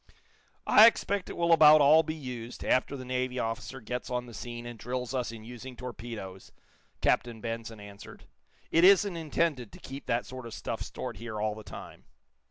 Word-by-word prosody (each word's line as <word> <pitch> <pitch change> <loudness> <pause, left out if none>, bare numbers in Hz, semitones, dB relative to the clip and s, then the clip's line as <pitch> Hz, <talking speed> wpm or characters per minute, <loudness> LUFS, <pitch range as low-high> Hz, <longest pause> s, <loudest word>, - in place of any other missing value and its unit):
"I 220 - +9
expect 200 -4 0
it - - -7
will 170 0 +3
about 155 -1 +8
all 150 +3 +7
be 155 0 -5
used, 125 -5 -7
after 130 +2 +1
the 130 - -8
Navy 125 0 -2
officer 115 +2 -3
gets 125 +1 -5
on 125 0 -2
the 120 - -12
scene, 120 +1 -7
and 120 -2 -8
drills 125 +1 -4
us 125 -3 -2
in 115 -1 -10
using 125 +2 -9
torpedoes," 115 -6 -8 0.5
Captain 120 -2 +1
Benson 115 -1 -5
answered. 100 0 -12 0.5
"It 165 - +4
isn't 195 0 +6
intended 155 -7 -1
to - - -12
keep 135 +1 -9
that 120 +1 0
sort 130 -2 -8
of 115 - -8
stuff - - -5
stored - - -6
here 110 -2 -6
all 105 0 0
the 110 0 -10
time." - - -11
125 Hz, 185 wpm, -29 LUFS, 115-140 Hz, 0.5 s, I